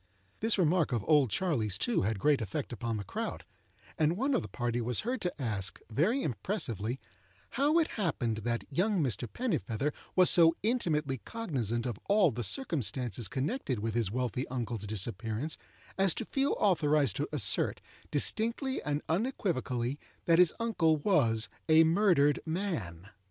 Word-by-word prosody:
This 225 0 +1
remark 170 -3 +2
of 115 -5 -1
"Old 145 -5 +4
Charley's," 115 - 0
too, 240 - 0
had 110 +1 -1
great 145 +6 +2
effect 120 +6 -4
upon 115 -2 -3
the 100 - -4
crowd; 95 - -5 0.6
and 160 +3 +2
one 270 +5 0
of 250 - +2
the - - -7
party 120 -1 -2
was 120 +1 0
heard 245 +3 -3
to 180 -4 -3
ask, 105 -7 -1
very 190 - +1
impressively, 125 - -2 0.5
"how 285 +6 +2
it 330 - +3
happened 140 - -2
that 115 +2 -2
young 185 +3 +1
Mr. 120 -2 -2
Pennifeather 150 - -2 0.2
was 185 -1 +6
so 165 -1 +6
intimately 155 - 0
cognizant 125 - -3
of 120 -5 -4
all 200 -6 +4
the 120 +1 -4
circumstances 125 - 0
connected 135 - -2
with 110 +1 -3
his 115 -4 0
wealthy 125 +3 -2
uncle's 115 -4 -4
disappearance, 110 - -3 0.4
as 195 -3 +3
to - - -3
feel 275 +1 0
authorized 150 -7 +2
to 145 - -2
assert, 125 -11 +3 0.3
distinctly 230 - +1
and 145 0 -2
unequivocally, 150 - -1 0.3
that 165 0 +4
his 180 -3 +6
uncle 175 -9 +2
was 130 - +3 0.2
'a 160 +1 +7
murdered 165 -4 +3
man. 160 - -4
145 Hz, 155 wpm, -31 LUFS, 115-185 Hz, 0.6 s, a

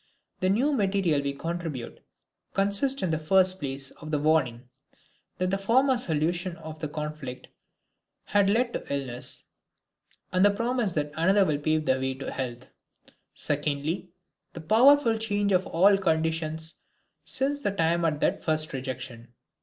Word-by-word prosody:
The 185 - +1
new 245 +10 +2
material 195 - +1
we 140 0 -2
contribute 165 -4 -5 0.6
consists 200 +7 +1
in 180 - 0
the 160 - 0
first 185 +3 +3
place 135 -1 -4
of 155 - -11
the 155 - +1
warning, 135 -6 +1 0.7
that 185 0 0
the 195 - 0
former 260 +7 +3
solution 170 -1 0
of 160 -1 -9
the 155 - -3
conflict 150 -4 -6 0.7
had 200 -1 +2
led 240 +3 +1
to - - -5
illness, 130 -3 -3 0.9
and 185 +1 +3
the 205 - +7
promise 230 -1 -1
that 150 -2 -1
another 190 +5 +4
will 150 -4 0
pave 155 +1 0
the 130 -2 +2
way 130 0 -2
to 135 - -6
health; 125 -1 -5 0.7
secondly, 150 +4 -2 0.4
the 165 - -8
powerful 230 - +5
change 205 -2 0
of 185 0 +2
all 195 +4 +5
conditions 160 -2 -1 0.5
since 275 +2 -1
the 230 - 0
time 170 -3 +1
of 155 -3 +1
that - - +1
first 155 -1 +1
rejection. 130 -3 -6
165 Hz, 150 wpm, -27 LUFS, 145-200 Hz, 0.9 s, the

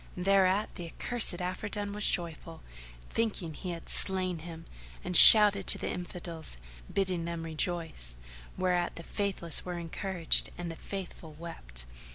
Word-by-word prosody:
Thereat 195 +2 0
the 175 -3 -9
accursed 215 0 +1
Afridun 200 +3 -6
was 210 0 +5
joyful, 165 -1 -3 0.5
thinking 210 -8 -4
he 185 - -9
had 170 -1 -9
slain 185 -3 +1
him; 165 0 -12 0.4
and 180 - -5
shouted 205 -2 +10
to - - +4
the - - -6
Infidels 175 - -8 0.3
bidding 185 -4 -3
them 170 -1 -7
rejoice, 160 - -5 0.4
whereat 180 -1 -2
the 170 - -9
Faithless 190 -5 -4
were 180 -1 -7
encouraged 170 +1 -3
and 175 -1 -7
the - - -10
Faithful 175 -4 -10
wept. 60 - -11
175 Hz, 140 wpm, -27 LUFS, 165-190 Hz, 0.5 s, shouted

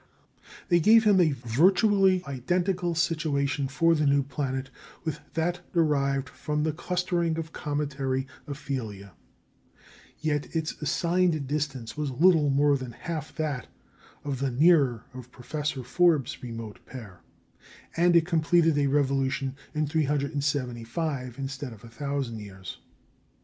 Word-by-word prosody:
They 175 -1 +5
gave 220 +6 +6
him 205 -4 +5
a 160 -4 +3
virtually 185 - +3
identical 175 +6 -1
situation 145 -4 0
for 165 +5 +3
the 150 -2 +2
new 140 0 +3
planet 135 -1 -3 0.3
with 160 -2 -3 0.2
that 175 +2 0
derived 140 -5 +1
from 150 0 -3
the 155 - +1
clustering 175 -1 -1
of 160 -1 -5
cometary 140 -3 -2 0.2
aphelia. 125 -9 -5 1.1
Yet 150 0 -2
its 160 -1 0
assigned 170 0 +1
distance 135 -5 -3
was 150 -1 -2
little 155 +2 +4
more 145 +1 +4
than 130 -3 -7
half 155 +5 -6
that 150 -5 -3 0.6
of 140 -3 -3
the 135 0 0
nearer 135 -4 +4
of 125 -1 -10
Professor 140 +1 -4
Forbes's 155 +1 +2
remote 115 -3 -7
pair, 110 -9 -10 0.7
and 175 +1 +4
it 165 -1 +5
completed 165 -1 +3
a 140 - +2
revolution 135 -1 0 0.2
in 155 0 +1
375 140 -3 -1
instead 135 -2 -5
of 105 - -15
1,000 130 0 -4
years. 95 -3 -9
145 Hz, 125 wpm, -27 LUFS, 130-165 Hz, 1.1 s, gave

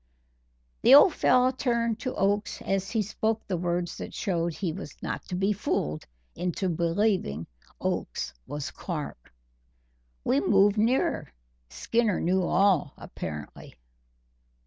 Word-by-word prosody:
The 260 - +8
old 295 +4 +8
fellow 255 -2 +4
turned 235 -3 0
to 255 - -4
Oakes 205 +2 0
as 195 0 -1
he 225 -2 0
spoke 220 +2 -2
the 190 - -2
words 175 0 -2
that - - -7
showed 170 -3 -1
he 175 -5 -2
was 150 - -8
not - - -3
to 180 - -5
be 195 +3 +1
fooled 75 - -2 0.3
into 180 +1 -2
believing 170 - 0 0.3
Oakes - - -3
was 145 -1 -5
Clark. 150 - -6 0.9
We 135 - +2
moved 200 +6 +4
nearer. 235 +5 +1 0.4
Skinner 230 -4 0
knew 185 +2 +2
all, 185 -5 +2
apparently. 75 -2 -8
195 Hz, 125 wpm, -27 LUFS, 170-220 Hz, 0.9 s, The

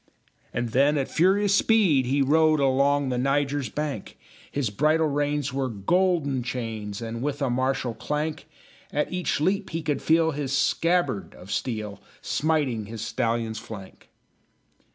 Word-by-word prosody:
And 120 0 -2
then 140 +5 +3
at 135 - -1
furious 195 +4 +3
speed 195 - +4
he 140 +2 +2
rode 155 +2 +4
Along 140 +1 +2
the 125 -1 -1
Niger's 140 -1 0
bank; 150 +1 -4 0.3
His 135 -7 -1
bridle 155 +8 +2
reins 145 -1 -1
were 135 -1 -1
golden 145 - +1
chains, 115 -4 -4
And, 115 0 -5
with 145 +1 -2
a 140 -4 0
martial 130 -1 0
clank, 150 +5 -3 0.4
At 150 +4 -1
each 180 -5 -1
leap 190 +6 0
he 165 0 -4
could 145 -2 -1
feel 160 0 +3
his 140 -2 -3
scabbard 165 - +1
of 95 +2 -11
steel 105 -5 -3 0.2
Smiting 140 -9 0
his 110 0 -6
stallion's 115 -1 -1
flank. 110 -4 -11
140 Hz, 145 wpm, -25 LUFS, 120-155 Hz, 0.4 s, speed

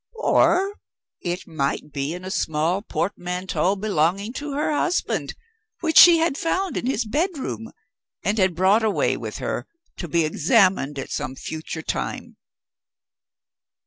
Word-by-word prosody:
Or 370 +5 +3 0.5
it 175 +1 -3
might 150 -2 -2
be 145 +3 -3
in 180 +1 -9
a 190 - -5
small 160 +3 0
portmanteau 180 -1 -1
belonging 195 +1 0
to 290 +1 -5
her 295 +2 0
husband, 350 +4 -1 0.5
which 320 -2 +5
she 345 -1 +10
had 325 -3 0
found 370 +3 -1
in - - -2
his 240 -3 0
bedroom, 285 - -2 0.5
and 210 +2 0
had 185 -3 +2
brought 190 +5 +4
away 215 -2 +1
with - - -6
her, - - -3 0.3
to 175 - -5
be 170 0 +2
examined 165 - +2
at 135 - -6
some 130 - -3
future 160 +2 -6
time. - - -4
195 Hz, 140 wpm, -23 LUFS, -, 0.5 s, she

